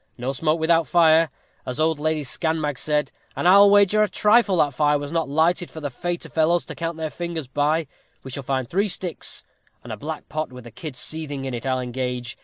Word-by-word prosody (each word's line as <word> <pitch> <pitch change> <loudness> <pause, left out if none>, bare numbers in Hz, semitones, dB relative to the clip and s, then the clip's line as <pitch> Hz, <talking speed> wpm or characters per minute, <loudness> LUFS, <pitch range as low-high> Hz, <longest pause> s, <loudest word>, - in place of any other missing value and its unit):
No 130 +2 -3
smoke 155 +4 0
without 165 0 +2
fire, 165 -2 +5 0.3
as 125 - -5
old 160 -1 +1
Lady 155 0 0
Scanmag 150 0 -2
said; 150 -1 0 0.2
and - - 0
I'll 200 +2 +8
wager 205 +1 +5
a 210 - +3
trifle 210 -3 +3
that 145 -4 +2
fire 150 +2 +2
was 145 0 -6
not 165 -3 -1
lighted 165 +4 +1
for 160 - -9
the 145 -2 -4
fayter 175 +7 -4
fellows 165 +2 +1
to - - -7
count 165 -1 -4
their 160 -1 -3
fingers 170 -3 -4
by. 145 +5 0 0.4
We 130 - -8
shall 140 - -4
find 130 -1 -2
three 200 - +1
sticks, 180 -2 -6 0.4
and - - -7
a - - -6
black - - -6
pot 155 -2 -4
with 125 -1 -11
a 120 - -10
kid 150 +4 -8
seething 145 0 -5
in 130 - -4
it, 120 +2 -4
I'll 130 -1 +1
engage. 125 -1 -4
155 Hz, 215 wpm, -23 LUFS, 135-170 Hz, 0.4 s, I'll